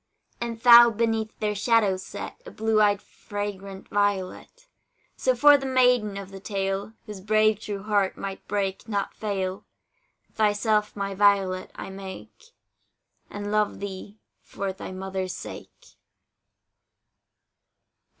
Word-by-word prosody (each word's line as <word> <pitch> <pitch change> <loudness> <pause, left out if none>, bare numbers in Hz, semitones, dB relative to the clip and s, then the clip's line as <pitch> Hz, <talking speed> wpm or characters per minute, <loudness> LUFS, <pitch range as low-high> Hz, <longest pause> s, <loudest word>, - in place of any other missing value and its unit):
And 235 -1 -4
thou 240 -1 +9
beneath 225 -1 -1
their 210 -1 -1
shadow 210 -2 +2
set, 185 - -8
A - - -6
blue 220 - +1
eyed 205 -1 +3
fragrant 200 -1 -7
violet. 205 - -2 0.5
So 255 -1 +1
for 290 +3 +7
the 270 - -4
maiden 250 -6 +3
of 195 -1 -8
the 195 - -9
tale, 195 +1 -3
Whose 210 -4 -8
brave 215 +1 +3
true 205 -3 -6
heart 205 -3 +1
might 195 -1 -7
break, 195 0 -2
not 200 -3 -2
fail, 195 -3 -3 0.7
Thyself, 210 0 +1
my 200 -1 -3
Violet 195 -2 +2
I - - -7
make, 195 - -10 0.8
And 205 0 -5
love 210 -1 +1
thee 200 +1 -7 0.2
for 195 -1 -5
thy 190 - -8
mother's 190 -1 -4
sake. - - -11
205 Hz, 125 wpm, -25 LUFS, 195-220 Hz, 0.8 s, thou